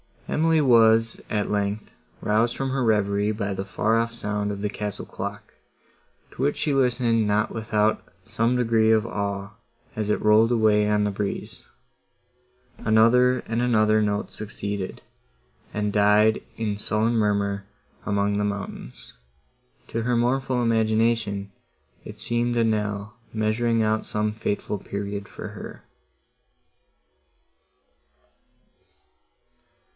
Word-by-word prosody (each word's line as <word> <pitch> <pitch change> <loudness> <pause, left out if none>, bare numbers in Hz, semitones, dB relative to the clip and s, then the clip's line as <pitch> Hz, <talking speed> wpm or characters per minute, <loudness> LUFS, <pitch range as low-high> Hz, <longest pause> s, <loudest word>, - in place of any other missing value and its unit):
Emily 160 0 +2
was, 115 -3 +4
at 105 -1 -1
length, 105 +1 -2 0.3
roused 110 +3 +1
from 135 0 -2
her 130 0 -1
reverie 105 -1 +1
by 100 -2 -3
the 95 0 -4
far 110 +3 +1
off 115 0 -1
sound 105 -2 -2
of 100 -1 -4
the 105 - -1
castle 105 -1 -5
clock, - - -7 0.8
to - - -8
which 145 +2 +1
she 150 - -1
listened 120 -4 +2
not 105 +1 +1
without 110 -1 0 0.2
some 115 +2 0
degree 115 -2 +3
of 110 0 +3
awe, 100 -2 -3 0.4
as 110 -1 -2
it 105 - +1
rolled 110 +2 +5
away 110 -3 +3
on 105 0 +2
the 105 - 0
breeze. 100 0 -5 1.1
Another 125 +4 +4
and 115 +1 -3
another 110 -3 +3
note 105 -1 -1
succeeded, 100 -2 -5 0.7
and 105 0 -1
died 105 +1 +4 0.2
in 105 -2 -2
sullen 110 +2 +1
murmur 100 -3 0 0.4
among 100 0 0
the 105 - 0
mountains:—to 70 - -8
her 120 +1 0
mournful 125 +1 +1
imagination 110 -3 +1 0.5
it 105 0 -10
seemed 120 +2 -1
a 115 - +3
knell 105 0 -2 0.2
measuring 110 +1 +1
out 110 0 0
some 105 0 0
fateful 105 -1 -3
period 100 +1 -5
for - - -8
her. - - -10
110 Hz, 120 wpm, -24 LUFS, 105-115 Hz, 1.1 s, rolled